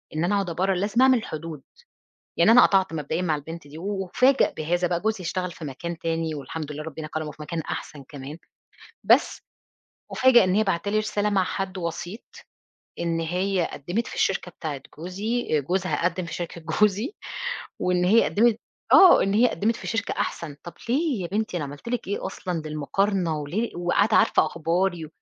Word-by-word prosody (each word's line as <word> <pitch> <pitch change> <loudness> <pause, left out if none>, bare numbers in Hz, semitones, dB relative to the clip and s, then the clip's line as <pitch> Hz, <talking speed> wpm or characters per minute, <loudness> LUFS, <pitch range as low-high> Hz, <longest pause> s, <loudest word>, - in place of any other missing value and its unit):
إن 155 - 0
أنا 205 +4 +2
أقعد 195 -3 0
أبرّر، 190 +3 0
لازم 205 +6 +1
أعمل 260 -3 +5
حدود، 155 -2 -6 0.8
يعني - - +6
أنا 245 +2 +8
قَطَعت 190 -3 +2
مبدئيًا 155 +2 -2
مع 160 -4 +1
البنت 160 +1 -8
دي، 145 +2 -11
وأُفاجَأ 200 +8 +2
بهذا 175 +3 0
بقى، 175 -1 0
جوزي 215 -2 -1
اشتغل 180 +1 -2
في 165 -1 -9
مكان 165 +5 -5
تاني 165 -1 -2
والحمد 150 +1 -6
لله 150 +1 -6
ربنا 155 0 -6
كرمُه 155 0 -4
في 155 - -13
مكان 165 +2 -4
أحسن 145 -1 -6
كمان، 145 +2 -8 0.7
بس - - +3 0.7
أُفاجَأ 255 -3 +6
إن 185 0 +1
هي 215 - +4
باعتة 195 0 -1
لي 215 - +2
رسالة 210 -1 0
مع 195 -2 +2
حد 190 +1 -4
وسيط، 175 +4 -5 0.8
إن 170 -1 -1
هي 180 +2 0
قدّمِت 180 +11 -3
في - - -7
الشركة 190 -2 0
بتاعة 155 -5 -5 0.2
جوزي، 190 0 -1
جوزها 180 +4 -1
قدِّم 180 +1 0
في - - -6
شركة 170 -1 -5
جوزي، 210 - +1 0.7
وإن 180 0 +2
هي 215 +6 +5
قدّمِت 230 +1 +3 0.3
آه، 375 -2 +8
إن 195 +1 0
هي 240 +3 +5
قدِّمِت 215 +5 0
في - - -9
شركة 225 -1 -1
أحسن، 150 -4 -3
طَب 175 - -8 0.2
ليه 270 - +1
يا 170 - -4
بنتي 210 -1 -2
أنا 160 - -2
عملت 145 +9 -9
لِك 240 -5 -3
إيه 200 - -2
أصلًا 175 -4 -4
للمقارنة؟ 165 +3 0
وليه 180 +11 -3
وقاعدة 190 +5 +2
عارفة - - +4
أخباري 170 +1 -1
و - - -9
180 Hz, 185 wpm, -25 LUFS, 160-205 Hz, 0.8 s, أنا